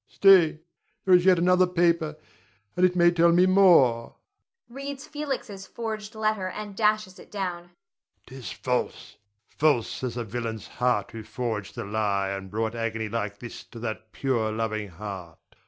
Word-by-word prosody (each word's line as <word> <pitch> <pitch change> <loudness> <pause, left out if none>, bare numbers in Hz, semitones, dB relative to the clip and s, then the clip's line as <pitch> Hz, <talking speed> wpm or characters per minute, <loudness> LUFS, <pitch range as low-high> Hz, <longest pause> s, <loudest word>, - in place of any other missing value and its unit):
Stay, 185 -6 +5 0.5
there 190 - +4
is 180 +1 +5
another 180 0 +5
paper, 170 -3 +1 0.6
and 180 - 0
it 180 - -5
may 175 -1 +5
tell 170 0 +4
me 175 +2 +5
more. 170 -12 +4 0.5
[Reads 275 +3 -7
Felix's 265 -10 -5
forged 220 -2 -6
letter 215 -3 0
and 205 +1 -7
dashes 210 -3 0
it - - -14
down.] 180 -4 -4 0.6
'Tis 130 -1 -8
false, 125 -1 -3 0.3
false 145 -6 0
as 120 -2 -3
the 120 - -3
villain's 110 -1 -5
heart 125 -5 0
who 115 - -7
forged 110 -2 -4
the - - -5
lie 100 -2 0
and 95 -1 -5
brought 110 +2 -2
agony 115 -2 -3
like 105 -2 -3
this 120 0 -9
to - - -13
that 110 -1 -6
pure, 115 -5 -1
loving 110 -1 -2
heart. 90 -3 -8
135 Hz, 155 wpm, -26 LUFS, 110-185 Hz, 0.6 s, Stay